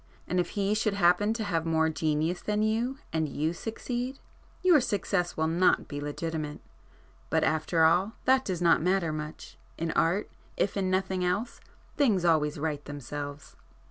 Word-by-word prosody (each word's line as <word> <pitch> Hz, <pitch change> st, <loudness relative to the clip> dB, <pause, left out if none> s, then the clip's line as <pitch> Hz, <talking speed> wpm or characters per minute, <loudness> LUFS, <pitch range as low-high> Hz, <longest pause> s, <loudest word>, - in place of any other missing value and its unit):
And 180 Hz, -, 0 dB
if 175 Hz, +3 st, -2 dB
he 200 Hz, +1 st, +2 dB
should 215 Hz, -1 st, 0 dB
happen 195 Hz, +3 st, +3 dB
to 225 Hz, -, -2 dB
have 170 Hz, -6 st, -1 dB
more 160 Hz, -1 st, +2 dB
genius 160 Hz, +2 st, 0 dB
than 210 Hz, 0 st, 0 dB
you, 230 Hz, +5 st, 0 dB, 0.2 s
and 160 Hz, -2 st, 0 dB
you 155 Hz, +4 st, -1 dB
succeed, 245 Hz, +6 st, -4 dB, 0.5 s
your 350 Hz, -6 st, +6 dB
success 200 Hz, -6 st, -1 dB
will 160 Hz, -, +1 dB
not 175 Hz, +3 st, +2 dB
be 145 Hz, 0 st, -5 dB
legitimate. 150 Hz, 0 st, -4 dB, 0.7 s
But -, -, +2 dB
after 160 Hz, +1 st, +2 dB
all, 180 Hz, +7 st, +3 dB
that 260 Hz, 0 st, +4 dB
does 180 Hz, -5 st, -3 dB
not 170 Hz, -2 st, +5 dB
matter 180 Hz, -2 st, +1 dB
much—in 155 Hz, +2 st, -6 dB
Art, 175 Hz, +7 st, +1 dB, 0.3 s
if 200 Hz, -, 0 dB
in 190 Hz, -2 st, 0 dB
nothing 185 Hz, 0 st, 0 dB
else, 200 Hz, +7 st, -1 dB, 0.4 s
things 215 Hz, -, +3 dB
always 155 Hz, -3 st, +2 dB
right 150 Hz, -1 st, -2 dB
themselves." 145 Hz, +1 st, -7 dB
175 Hz, 160 wpm, -28 LUFS, 160-205 Hz, 0.7 s, your